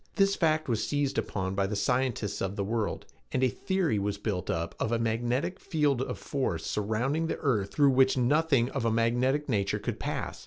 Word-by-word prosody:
This 195 Hz, -1 st, +3 dB
fact 155 Hz, -2 st, +1 dB
was 115 Hz, -4 st, 0 dB
seized 145 Hz, -2 st, 0 dB
upon 95 Hz, -1 st, -3 dB
by 95 Hz, 0 st, +1 dB
the 105 Hz, -, -3 dB
scientists 125 Hz, -4 st, 0 dB
of 95 Hz, +1 st, -2 dB
the 100 Hz, -, -1 dB
world 110 Hz, +1 st, -2 dB, 0.3 s
and 130 Hz, -, 0 dB
a 130 Hz, -, +4 dB
theory 185 Hz, -, 0 dB
was 100 Hz, 0 st, -2 dB
built 100 Hz, -3 st, -3 dB
up 85 Hz, 0 st, -2 dB
of 110 Hz, -, -1 dB
a 115 Hz, -, +2 dB
magnetic 120 Hz, +9 st, -1 dB
field 145 Hz, -6 st, +1 dB
of -, -, -3 dB
force 105 Hz, -, -2 dB
surrounding 125 Hz, +10 st, -1 dB
the -, -, -2 dB
earth 110 Hz, -9 st, 0 dB
through 140 Hz, -2 st, +4 dB
which 130 Hz, 0 st, +4 dB
nothing 135 Hz, -1 st, +2 dB
of 135 Hz, -, -2 dB
a 115 Hz, -, +2 dB
magnetic 120 Hz, +6 st, +1 dB
nature 100 Hz, -6 st, 0 dB
could -, -, -4 dB
pass. -, -, -4 dB
120 Hz, 200 wpm, -29 LUFS, 105-140 Hz, 0.3 s, a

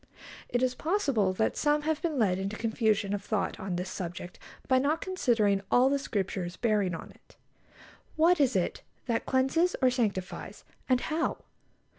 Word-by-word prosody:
It 245 Hz, +1 st, 0 dB
is 255 Hz, -1 st, +2 dB
possible 275 Hz, -, +1 dB
that 220 Hz, +4 st, 0 dB
some 295 Hz, 0 st, +1 dB
have 310 Hz, 0 st, -1 dB
been 325 Hz, -5 st, -1 dB
led 190 Hz, -6 st, +2 dB
into 195 Hz, +2 st, -3 dB
confusion 220 Hz, -3 st, 0 dB
of 200 Hz, -1 st, -3 dB
thought 210 Hz, -1 st, -2 dB
on 190 Hz, -3 st, -3 dB
this 180 Hz, +1 st, -4 dB
subject 175 Hz, -1 st, -6 dB, 0.3 s
by 260 Hz, -1 st, +4 dB
not 295 Hz, +5 st, +1 dB
considering 230 Hz, -, +1 dB
all 255 Hz, +2 st, +5 dB
the 280 Hz, 0 st, +1 dB
Scriptures 190 Hz, -7 st, -3 dB
bearing 210 Hz, -6 st, +1 dB
on -, -, -9 dB
it. -, -, -23 dB, 0.8 s
What 335 Hz, +2 st, +4 dB
is 260 Hz, -5 st, +3 dB
it 180 Hz, -2 st, 0 dB, 0.2 s
that 230 Hz, -3 st, -1 dB
cleanses 270 Hz, +7 st, +2 dB
or 255 Hz, -1 st, +4 dB
sanctifies, 205 Hz, -7 st, -3 dB, 0.3 s
and 255 Hz, -1 st, +3 dB
how? 320 Hz, +1 st, -2 dB
235 Hz, 165 wpm, -29 LUFS, 195-280 Hz, 0.8 s, all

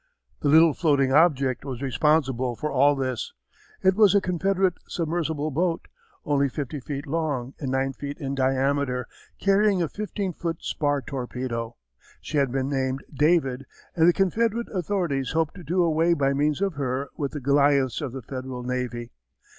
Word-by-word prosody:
The -, -, -1 dB
little 160 Hz, +1 st, +6 dB
floating 140 Hz, -5 st, +2 dB
object 140 Hz, -5 st, +3 dB
was 130 Hz, -1 st, -6 dB
responsible 130 Hz, -2 st, +1 dB
for 150 Hz, +6 st, -3 dB
all 140 Hz, +2 st, +4 dB
this. 130 Hz, -3 st, -3 dB, 0.5 s
It 190 Hz, 0 st, +5 dB
was 205 Hz, -1 st, +5 dB
a -, -, +7 dB
Confederate 190 Hz, 0 st, +1 dB
submersible 160 Hz, -2 st, -2 dB
boat, 165 Hz, +3 st, -1 dB, 0.4 s
only 140 Hz, -1 st, +2 dB
fifty 145 Hz, +2 st, -4 dB
feet 140 Hz, +2 st, -5 dB
long 145 Hz, -5 st, -2 dB
and 140 Hz, -, -3 dB
nine 135 Hz, +1 st, 0 dB
feet 140 Hz, +1 st, -6 dB
in 135 Hz, -1 st, -4 dB
diameter, 135 Hz, -1 st, 0 dB, 0.3 s
carrying 200 Hz, 0 st, +3 dB
a 170 Hz, -, +1 dB
fifteen 200 Hz, 0 st, -4 dB
foot 165 Hz, 0 st, -3 dB
spar 145 Hz, -2 st, -1 dB
torpedo. 125 Hz, -3 st, -4 dB, 0.4 s
She 155 Hz, -, -4 dB
had 135 Hz, -3 st, +1 dB
been 135 Hz, 0 st, -1 dB
named 135 Hz, -1 st, -1 dB
David 140 Hz, -3 st, +1 dB, 0.3 s
and 165 Hz, -1 st, +4 dB
the -, -, +7 dB
Confederate 225 Hz, +5 st, 0 dB
authorities 170 Hz, -8 st, -1 dB
hoped 160 Hz, -1 st, 0 dB
to 180 Hz, -, -11 dB
do 175 Hz, +4 st, +1 dB
away 165 Hz, +1 st, +3 dB
by 140 Hz, -2 st, +1 dB
means 150 Hz, +4 st, 0 dB
of 195 Hz, -2 st, +1 dB
her 140 Hz, -1 st, -2 dB
with 140 Hz, -2 st, -3 dB
the 150 Hz, -, -4 dB
Goliaths 140 Hz, -2 st, +2 dB
of 140 Hz, -4 st, -3 dB
the 130 Hz, 0 st, -7 dB
Federal 130 Hz, 0 st, -6 dB
navy. 120 Hz, -1 st, -3 dB
145 Hz, 165 wpm, -25 LUFS, 130-165 Hz, 0.5 s, a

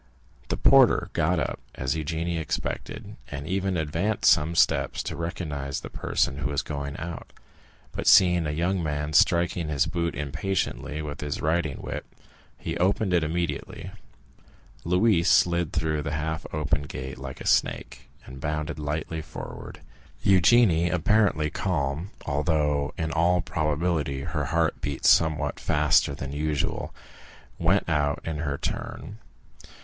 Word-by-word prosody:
The -, -, -2 dB
porter -, -, +5 dB
got 80 Hz, +2 st, +1 dB
up -, -, -2 dB, 0.2 s
as 65 Hz, -1 st, -1 dB
Eugénie 80 Hz, +2 st, -2 dB
expected, 80 Hz, -, -4 dB
and 70 Hz, 0 st, -6 dB
even 95 Hz, +1 st, -1 dB
advanced 85 Hz, +7 st, +2 dB
some 80 Hz, +3 st, +2 dB
steps 80 Hz, -1 st, +2 dB
to -, -, -4 dB
recognize 75 Hz, -5 st, -4 dB
the -, -, -9 dB
person 70 Hz, -, 0 dB
who 70 Hz, -1 st, -1 dB
was 70 Hz, -1 st, -1 dB
going 70 Hz, -1 st, -5 dB
out, 85 Hz, +2 st, -7 dB, 0.6 s
but -, -, -4 dB
seeing 90 Hz, -4 st, +6 dB
a -, -, -1 dB
young 90 Hz, +4 st, 0 dB
man 75 Hz, -1 st, -2 dB
striking 85 Hz, +1 st, +3 dB
his 70 Hz, -3 st, +2 dB
boot 85 Hz, 0 st, -2 dB
impatiently 75 Hz, +1 st, -2 dB
with 75 Hz, -1 st, -6 dB
his 75 Hz, -1 st, -3 dB
riding 80 Hz, -3 st, 0 dB
whip, -, -, -4 dB, 0.5 s
he -, -, -4 dB
opened 95 Hz, +1 st, +1 dB
it 85 Hz, -2 st, +3 dB
immediately. 80 Hz, -2 st, -3 dB, 0.9 s
Louise 90 Hz, 0 st, +3 dB
slid 85 Hz, -2 st, +3 dB
through 80 Hz, -1 st, -1 dB
the 75 Hz, 0 st, -4 dB
half 80 Hz, +1 st, -3 dB
open 75 Hz, -2 st, 0 dB
gate 65 Hz, -2 st, -7 dB
like 65 Hz, -1 st, -7 dB
a -, -, -8 dB
snake, -, -, 0 dB, 0.2 s
and 65 Hz, +1 st, -10 dB
bounded 75 Hz, 0 st, -3 dB
lightly 75 Hz, +2 st, -3 dB
forward. 75 Hz, -1 st, -9 dB, 0.4 s
Eugénie, 95 Hz, -3 st, +5 dB
apparently 90 Hz, -4 st, +2 dB
calm, 80 Hz, -1 st, -2 dB, 0.2 s
although 75 Hz, -1 st, 0 dB
in 80 Hz, -1 st, -2 dB
all 85 Hz, +2 st, +3 dB
probability 75 Hz, -3 st, -1 dB
her -, -, -2 dB
heart 85 Hz, -1 st, 0 dB
beat 70 Hz, -2 st, -3 dB
somewhat 75 Hz, -3 st, +3 dB
faster 75 Hz, -1 st, +2 dB
than 70 Hz, -1 st, -6 dB
usual, 75 Hz, 0 st, -2 dB, 0.7 s
went 90 Hz, +4 st, +2 dB
out 75 Hz, -2 st, +1 dB
in 80 Hz, -2 st, -3 dB
her 70 Hz, -2 st, -2 dB
turn. 95 Hz, -, -5 dB
80 Hz, 140 wpm, -26 LUFS, 75-85 Hz, 0.9 s, seeing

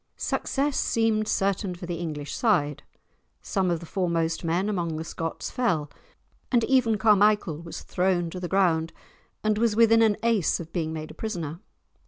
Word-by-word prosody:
Success 280 Hz, 0 st, -1 dB
seemed 220 Hz, -2 st, +1 dB
certain 195 Hz, -2 st, 0 dB
for 175 Hz, -, -8 dB
the 175 Hz, -1 st, -4 dB
English 150 Hz, -4 st, -5 dB
side; 155 Hz, -, +1 dB, 0.6 s
some 190 Hz, -2 st, -1 dB
of 170 Hz, -1 st, 0 dB
the -, -, -8 dB
foremost 165 Hz, -2 st, -1 dB
men 170 Hz, +4 st, 0 dB
among 170 Hz, -6 st, -2 dB
the 160 Hz, -, -4 dB
Scots 165 Hz, 0 st, -5 dB
fell, 170 Hz, -, 0 dB, 0.6 s
and 240 Hz, -3 st, +3 dB
even 240 Hz, -4 st, +3 dB
Carmichael 210 Hz, -5 st, +3 dB
was 170 Hz, -1 st, -8 dB
thrown 180 Hz, -2 st, 0 dB
to 185 Hz, -, -6 dB
the 180 Hz, -, -4 dB
ground 170 Hz, -4 st, +1 dB, 0.5 s
and 215 Hz, 0 st, +1 dB
was 230 Hz, -2 st, +2 dB
within 225 Hz, 0 st, +5 dB
an 220 Hz, -2 st, +4 dB
ace 230 Hz, -7 st, +2 dB
of 165 Hz, -1 st, -9 dB
being 160 Hz, -3 st, -1 dB
made 155 Hz, -1 st, -6 dB
a -, -, -11 dB
prisoner. 170 Hz, -7 st, -5 dB
185 Hz, 170 wpm, -26 LUFS, 165-215 Hz, 0.6 s, within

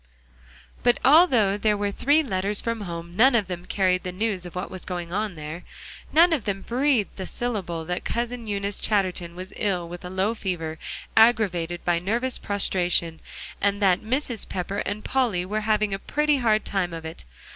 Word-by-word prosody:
But 245 Hz, 0 st, +3 dB
although 255 Hz, -, +5 dB
there 210 Hz, -1 st, +2 dB
were 205 Hz, 0 st, -1 dB
three 290 Hz, +9 st, +3 dB
letters 200 Hz, -4 st, -1 dB
from 230 Hz, -1 st, -2 dB
home, 170 Hz, -2 st, -6 dB
none 250 Hz, +5 st, +5 dB
of 215 Hz, -4 st, +3 dB
them 180 Hz, -1 st, -6 dB
carried 185 Hz, -2 st, +2 dB
the 180 Hz, -, -5 dB
news 190 Hz, -1 st, -2 dB
of 175 Hz, -, -12 dB
what 180 Hz, -, -4 dB
was 185 Hz, -2 st, -7 dB
going 175 Hz, -2 st, -5 dB
on 210 Hz, -1 st, -1 dB
there. 155 Hz, +3 st, -7 dB, 0.5 s
None 335 Hz, +2 st, +6 dB
of 275 Hz, -9 st, -1 dB
them 195 Hz, -1 st, -2 dB
breathed 250 Hz, -5 st, 0 dB
a 190 Hz, -, -4 dB
syllable 190 Hz, -9 st, -3 dB
that 180 Hz, +2 st, -3 dB
Cousin 235 Hz, 0 st, -3 dB
Eunice 200 Hz, -1 st, -2 dB
Chatterton 185 Hz, -4 st, -1 dB
was 185 Hz, +2 st, -8 dB
ill 180 Hz, -4 st, -1 dB
with 175 Hz, +1 st, -9 dB
a 180 Hz, -, -6 dB
low 190 Hz, +4 st, 0 dB
fever, 165 Hz, -7 st, -4 dB, 0.4 s
aggravated 190 Hz, -7 st, +3 dB
by 175 Hz, -1 st, +2 dB
nervous 235 Hz, +8 st, -1 dB
prostration; 175 Hz, -5 st, 0 dB, 0.4 s
and 200 Hz, 0 st, +2 dB
that 190 Hz, -3 st, +3 dB
Mrs. 245 Hz, 0 st, -1 dB
Pepper 190 Hz, +2 st, -3 dB
and 205 Hz, +1 st, -4 dB
Polly 230 Hz, -10 st, +1 dB
were 215 Hz, +3 st, -2 dB
having 215 Hz, -1 st, +1 dB
a 195 Hz, -, -2 dB
pretty 300 Hz, +5 st, +1 dB
hard 220 Hz, -4 st, +2 dB
time 180 Hz, -3 st, -1 dB
of 165 Hz, -1 st, -8 dB
it. 160 Hz, -, -8 dB
200 Hz, 185 wpm, -25 LUFS, 180-225 Hz, 0.5 s, None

